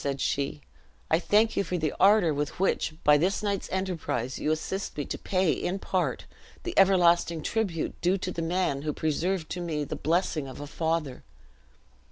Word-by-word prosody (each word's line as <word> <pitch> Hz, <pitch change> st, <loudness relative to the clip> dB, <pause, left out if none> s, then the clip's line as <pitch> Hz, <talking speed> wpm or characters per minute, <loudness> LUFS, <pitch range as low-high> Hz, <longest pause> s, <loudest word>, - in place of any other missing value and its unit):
said 140 Hz, -1 st, -2 dB
she, 140 Hz, +2 st, -1 dB, 0.5 s
"I 160 Hz, -, +5 dB
thank 215 Hz, +5 st, +3 dB
you -, -, +2 dB
for 180 Hz, 0 st, -2 dB
the 155 Hz, -3 st, -1 dB
ardor 195 Hz, -5 st, +5 dB
with 145 Hz, +3 st, -3 dB
which, 185 Hz, -4 st, 0 dB
by 150 Hz, 0 st, +6 dB
this 185 Hz, +6 st, 0 dB
night's 200 Hz, -2 st, -2 dB
enterprise, 165 Hz, -10 st, -2 dB
you -, -, -1 dB
assist 160 Hz, +5 st, -2 dB
me 145 Hz, -, -2 dB
to -, -, -4 dB
pay, 185 Hz, -3 st, +1 dB
in 180 Hz, +2 st, -2 dB
part, 185 Hz, -2 st, -1 dB, 0.4 s
the 355 Hz, -, -4 dB
everlasting 175 Hz, -4 st, +4 dB
tribute 195 Hz, -8 st, -2 dB
due 180 Hz, +3 st, +2 dB
to 185 Hz, -1 st, -4 dB
the 170 Hz, -, -4 dB
man 165 Hz, -4 st, 0 dB
who 150 Hz, 0 st, -2 dB
preserved 160 Hz, +3 st, -1 dB
to 180 Hz, -, -3 dB
me 155 Hz, -4 st, -2 dB
the -, -, -5 dB
blessing 160 Hz, -2 st, 0 dB
of 130 Hz, -, -9 dB
a 145 Hz, -, -5 dB
father. 160 Hz, -3 st, -2 dB
170 Hz, 185 wpm, -27 LUFS, 150-190 Hz, 0.5 s, by